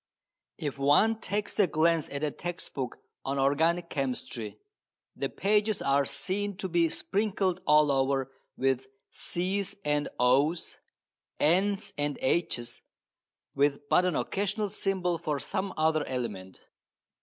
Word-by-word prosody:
If 145 -2 -4
one 180 +11 +4
takes 205 0 -3
a 200 - +6
glance 165 -1 +2
at 140 +1 -4
a 150 - +1
text 175 +4 -6
book 130 -3 -4 0.3
on 135 +1 -2
organic 160 +6 +2
chemistry 125 -5 -3 0.6
the - - -2
pages 210 +1 +1
are 140 0 +2
seen 200 +4 -2
to 190 - -3
be 170 -2 +2
sprinkled 195 -1 0
all 150 -1 +6
over 135 0 +1 0.3
with 130 0 +1 0.2
C's 195 +3 -2
and 150 0 +1
O's, 140 +7 +2 0.6
N's 195 +6 +2
and 145 -1 0
H's, 130 -6 -1 0.7
with 140 +1 +1
but 180 - +5
an 180 - +1
occasional 205 +1 -1
symbol 185 -4 -1
for 155 -4 -2
some 195 +3 -2
other 155 -1 +2
element. 105 -8 -5
160 Hz, 130 wpm, -29 LUFS, 140-190 Hz, 0.7 s, a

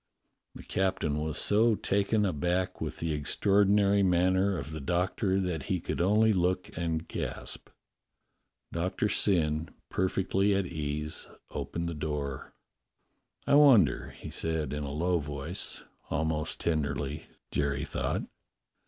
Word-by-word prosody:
The - - -9
captain 85 -6 0
was 75 0 -2
so 110 +2 +4
taken 100 +2 +1
aback 90 +1 -1
with - - -3
the 80 -1 -2
extraordi 100 +7 +2
nary 100 0 +4
manner 95 +1 +3
of 80 - -6
the 80 - -5
Doctor 90 - 0
that 90 -5 -2
he 95 -3 +1
could 85 - -3
only 105 +4 +4
look 90 0 0
and 80 -1 -2
gasp. - - -5 1.0
Doctor 90 +5 0
Syn, 80 -6 +2 0.2
perfectly 95 +1 +1
at 100 -1 +1
ease, 75 -2 -4 0.2
opened 85 0 -3
the 85 - -3
door. 75 -3 -4 0.9
"I - - +2
wonder?" 115 - +6
he - - -8
said 80 -2 -2
in 75 - -3
a 70 - -4
low 85 +4 +1
voice, 75 +5 -4 0.3
almost 80 0 -1
tenderly, 75 -2 -1 0.2
Jerry 70 0 0
thought. - - -2
85 Hz, 130 wpm, -29 LUFS, 75-95 Hz, 1.0 s, wonder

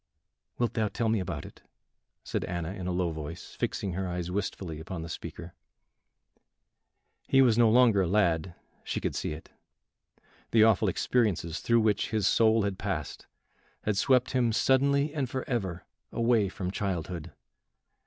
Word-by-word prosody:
"Wilt 120 -3 0
thou 110 -2 +1
tell 115 +2 -1
me 110 -1 +2
about 90 - -4
it?" - - -13 0.6
said - - -2
Anna, 85 0 -4
in 95 -2 -6
a - - -1
low 90 -1 0
voice, 80 +2 -7
fixing 95 -3 -2
her 95 +1 -2
eyes 90 0 -3
wistfully 95 -4 -3
upon 80 +1 -6
the 85 - -7
speaker. 85 +1 -7 1.7
He 135 - +4
was 120 -4 +4
no 115 -1 +5
longer 115 -3 +5
a 90 - +1
lad, 85 -3 +1 0.3
she - - -3
could - - -2
see - - -3
it; 75 - -11 1.0
the 110 -1 +5
awful 110 -4 +4
experiences 95 -9 0
through 115 0 +3
which 105 -2 +1
his 110 -4 0
soul 110 -1 +4
had 100 -2 -2
passed - - -4 0.6
had 105 - 0
swept 125 +4 +3
him 125 -3 +2
suddenly 140 +5 +2
and 140 -5 -2
forever 110 -10 -3 0.3
away 115 -4 +2
from 90 -1 -4
childhood. 90 -4 -3
100 Hz, 155 wpm, -29 LUFS, 90-115 Hz, 1.7 s, no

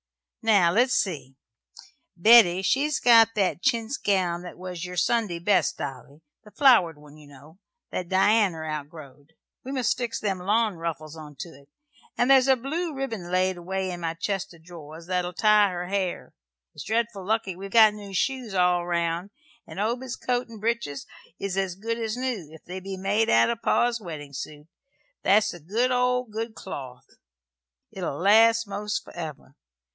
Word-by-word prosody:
Now, 200 -6 +4
let's 245 +6 +3
see. 140 -9 -2 0.8
Betty, 190 -2 +6
she's 285 +7 +1
got 225 -2 +6
that 195 -4 0
chintz 235 0 0
gown 180 -4 0
that 180 - -10
was 180 -1 -7
your 180 0 -6
Sunday 195 -1 +1
best, 180 -1 +1
Dolly 140 +2 -8 0.2
the 210 - -15
flowered 210 - +4
one, 150 0 -16
you 150 -1 -16
know, 145 +5 -17 0.3
that 180 -2 -4
Dianner 190 -4 +2
outgrowed. 150 -1 -8 0.3
We 265 - -7
must 250 -3 0
fix 240 -2 -3
them 195 -3 -2
lawn 210 +1 +1
ruffles 155 -2 -5
into 150 -1 -10
't; - - -47 0.5
and 245 +3 +3
there's 265 -1 +6
a 265 - +5
blue 315 +7 -3
ribbin 225 -10 -5
laid 185 0 +1
away 190 +2 -3
in 175 - -6
my 165 -1 -3
chest 195 +2 -3
o' - - -16
drawers 160 -1 -12
that'll 180 0 -2
tie 210 +1 +4
her 180 -1 -4
hair. 190 -3 -3 0.4
It's - - -9
dreadful 225 -3 -1
lucky 205 -2 -1
we've 195 +2 -8
got 220 0 +6
new 200 -2 -9
shoes 250 -1 -2
all 180 -1 +3
round; 170 +1 -1 0.4
and - - -9
Obed's 240 +4 -2
coat 245 0 -2
and 225 -2 -12
breeches 215 - -2 0.3
is 195 -2 -4
as 190 -2 -1
good 230 +4 -4
as 225 0 -3
new, 245 - -3
if 160 - -14
they 185 +2 -6
be 190 0 -7
made 205 +4 0
out 115 - +4
of 235 - -4
his - - -41
pa's 240 -1 +1
weddin' 150 -6 -8
suit. 150 +2 -8 0.6
That's 200 +3 +3
the 175 - -10
good 220 +11 0
o' 250 0 +2
good 225 0 -6
cloth. 130 -7 -8 0.9
It'll 175 -7 -4
last 225 +4 +5
most 205 +1 -3
forever. 155 -5 -9
190 Hz, 170 wpm, -25 LUFS, 170-225 Hz, 0.9 s, Betty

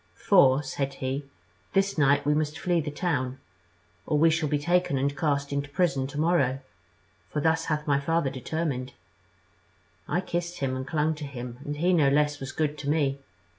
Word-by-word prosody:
'For,' 135 - +4
said 135 0 -3
he, 135 +2 -3 0.5
'this 195 +1 +2
night 145 -1 +3
we 150 - +3
must 155 0 -1
flee 175 -1 +1
the 150 - -4
town, 140 -5 -2 0.7
or 150 - +2
we 165 +2 +5
shall 160 -2 0
be 150 - +2
taken 175 0 +1
and 140 +2 0
cast 140 -3 0
into 140 +1 -2
prison 145 -5 +1
to 145 +2 -6
morrow; 155 -6 +2 0.7
for 150 - -2
thus 160 +2 +1
hath 150 -1 -1
my 140 -2 +2
father 155 -1 0
determined.' 130 -1 -3 1.1
I 180 - 0
kissed 175 -1 -3
him 135 -3 -1
and 130 +1 -5
clung 155 0 +1
to 150 -1 -7
him, 125 -3 -7
and 145 0 -4
he 175 +4 +2
no 150 -5 +4
less 150 +1 +2
was 135 0 -5
good 150 -1 -1
to 140 - -3
me. 140 -3 +1
145 Hz, 185 wpm, -27 LUFS, 140-160 Hz, 1.1 s, we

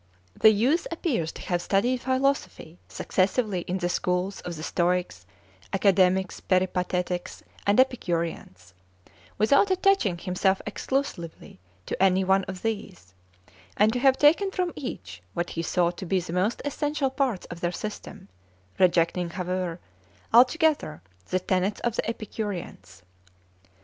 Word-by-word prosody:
The 220 - +7
youth 250 +11 +2
appears 260 - -1
to - - -9
have 175 -1 -1
studied 240 +8 +1
philosophy 260 - -1
successively 195 0 0
in 185 - -1
the 175 -2 -1
schools 180 +2 -1
of 175 - -6
the 155 - -7
Stoics, 175 - -1 0.5
Academics, 190 -1 +2
Peripatetics, 180 -1 -1 0.2
and 205 +4 +4
Epicureans, 170 - -1 0.6
without 280 - +4
attaching 375 - +2
himself 190 +2 0
exclusively 210 - -4 0.3
to - - -4
any 190 0 +4
one 190 0 +2
of 185 -1 -8
these, 205 - -5 0.6
and 215 +2 +4
to 250 - -1
have 265 0 +4
taken 330 +7 +4
from 365 -2 -2
each 95 - -7
what 175 0 -2
he 165 - -3
thought 175 +1 0
to 190 - -6
be 190 +1 +2
the 170 -1 -6
most 190 +6 0
essential 290 -1 -1
parts 260 -8 -1
of 170 - -7
their 175 - 0
system, 205 0 -7 0.5
rejecting, 175 -1 +2
however, 180 -1 -3 0.5
altogether 255 - +3 0.2
the 185 - 0
tenets 185 +2 0
of 235 -2 -1
the - - -1
Epicureans. 205 - -6
190 Hz, 135 wpm, -26 LUFS, 175-245 Hz, 0.6 s, The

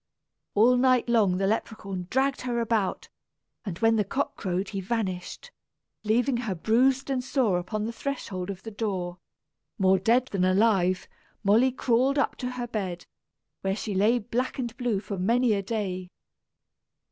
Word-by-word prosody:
All 240 +4 +5
night 255 -1 +3
long 215 -6 +3
the 195 - 0
Leperhaun 195 -3 -3
dragged 270 +1 +1
her 245 -1 -1
about; 220 -4 -1 0.5
and 190 -6 -5
when 225 +1 +3
the 210 - +3
cock 270 +8 -2
crowed 185 -1 -2
he 195 - -4
vanished, 200 - -3 0.5
leaving 240 +4 +2
her 225 -6 -2
bruised 255 +9 +2
and 255 -2 0
sore 250 -9 +1
upon 210 +4 -3
the 230 - -4
threshold 205 -9 -4
of 190 -1 -6
the 225 - -7
door. 185 -5 -3 0.6
More 190 -2 +4
dead 235 +6 +3
than 195 -2 0
alive, 185 -1 +2 0.4
Molly 225 +6 +4
crawled 255 +2 +1
up 280 - +1
to 250 - -3
her 245 -1 -3
bed, 190 -7 -4 0.6
where 195 0 0
she 210 0 -4
lay 210 +6 +3
black 240 +3 -2
and 240 -3 -3
blue 240 -5 0
for 200 -3 -5
many 230 +4 +3
a 200 - 0
day. 190 -3 -3
220 Hz, 160 wpm, -27 LUFS, 190-245 Hz, 0.6 s, All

